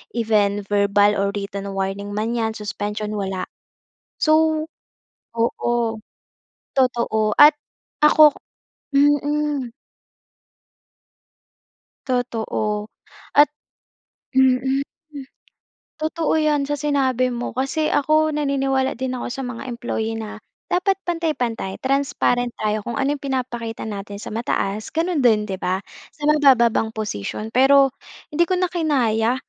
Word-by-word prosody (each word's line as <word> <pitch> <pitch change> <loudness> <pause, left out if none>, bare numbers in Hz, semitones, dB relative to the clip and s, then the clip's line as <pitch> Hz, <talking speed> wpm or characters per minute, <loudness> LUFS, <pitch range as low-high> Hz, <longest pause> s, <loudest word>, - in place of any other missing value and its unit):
even 210 -3 +1
verbal 205 0 +3
or 200 0 0
written 200 0 -5
warning 195 +1 -3
man 225 +3 -1
'yan, 225 -1 -1
suspension 210 0 -4
wala. 190 -2 -3 0.8
So 315 0 +3 0.7
oo, 230 0 0 0.8
totoo. 235 -4 +1
At 295 +1 +8 0.5
ako 300 -1 +7 0.6
mm. 290 -2 +1 2.3
Totoo 220 -4 -2 0.5
at 290 +1 +7 0.9
mm. 265 +1 +3 1.2
Totoo 315 0 0
'yan, 300 -2 +2
sa 290 +1 -3
sinabi 265 -4 +1
mo, 245 -1 -4
kasi 275 +5 -1
ako 310 +2 +3
naniniwala 270 -2 0
din 260 +1 -3
ako - - -4
sa 265 +2 -5
mga 250 +1 -6
employee 235 -2 -3
na 220 -1 -6 0.3
dapat 385 +2 +2
pantay-pantay. 295 - -2
Transparent 265 -3 0
tayo 215 0 -1
kung 235 - -3
ano 275 +3 +1
'yong - - -10
pinapakita 240 -4 -3
natin 205 -1 -6
sa - - -7
mataas, 215 -2 -2
gano'n 335 0 0
din 225 -5 +4
'di 195 -3 -5
ba, 185 +1 -1 0.3
sa 295 - -13
mabababang 240 -7 +4
posisyon 215 - -4
pero 270 +2 +5 0.4
hindi 335 +3 +2
ko 370 - +1
na 365 -1 0
kinaya. 250 -9 +1
245 Hz, 110 wpm, -21 LUFS, 215-290 Hz, 2.3 s, At